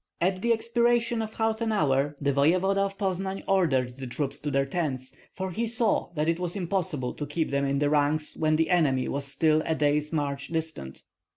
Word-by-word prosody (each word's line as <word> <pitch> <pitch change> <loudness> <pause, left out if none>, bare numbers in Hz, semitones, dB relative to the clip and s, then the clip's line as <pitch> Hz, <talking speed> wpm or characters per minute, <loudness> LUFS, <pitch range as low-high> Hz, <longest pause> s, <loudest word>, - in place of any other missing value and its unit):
At 185 +1 0
the 235 - +2
expiration 235 0 +2
of 220 0 -6
half 225 0 0
an 225 -1 0
hour 145 -6 +1
the 140 -1 +1
voevoda 180 +8 +3
of 195 0 -2
Poznan 190 0 -2
ordered 135 -10 +1
the 135 -1 -6
troops 140 +3 -3
to 150 - -3
their 135 -1 +1
tents, 135 -4 -3 0.2
for 190 0 -4
he 230 +5 -1
saw 230 -4 +1
that 150 0 0
it 165 +1 +1
was 180 0 -2
impossible 175 -8 -2
to 145 - -5
keep 155 +1 -2
them 140 0 +1
in 140 0 0
the 145 +1 +2
ranks 150 +1 +1
when 155 -1 +2
the 160 +3 +1
enemy 140 -7 +2
were 140 - -2
still 155 +3 +2
a 160 - 0
day's 150 0 +1
march 140 -3 -2
distant. 160 - -5
160 Hz, 205 wpm, -27 LUFS, 140-195 Hz, 0.2 s, voevoda